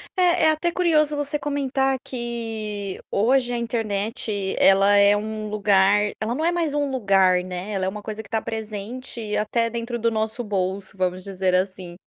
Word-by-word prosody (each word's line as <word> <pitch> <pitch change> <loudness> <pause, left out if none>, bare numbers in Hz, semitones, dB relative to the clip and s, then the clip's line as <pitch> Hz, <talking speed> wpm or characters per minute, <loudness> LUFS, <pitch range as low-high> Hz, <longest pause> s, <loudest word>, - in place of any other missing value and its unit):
É 355 -3 +3
é 315 - +6
até 330 +3 0
curioso 310 -4 +2
você 290 0 -2
comentar 270 -2 0
que, 225 -5 -5
hoje 245 +3 +2
a - - -1
internet 215 -3 -2
ela 195 +1 +5
é 200 0 +6
um 215 0 -4
lugar 205 0 +3
ela 230 +3 -1
não 315 - -1
é 340 - +3
mais 335 -4 -1
um 290 -1 0
lugar, 195 -7 +3
né, 185 +3 -6
ela 190 -2 -1
é - - 0
uma 210 +2 -7
coisa 215 0 -5
que 215 - -16
está 220 +2 -1
presente 220 +1 -5
até 230 +2 0
dentro 235 +1 -4
do 230 +1 +1
nosso 220 +2 -2
bolso, 195 -2 -3
vamos 185 0 -1
dizer, 190 -1 0
assim. 185 -1 -2
215 Hz, 180 wpm, -23 LUFS, 200-255 Hz, -, é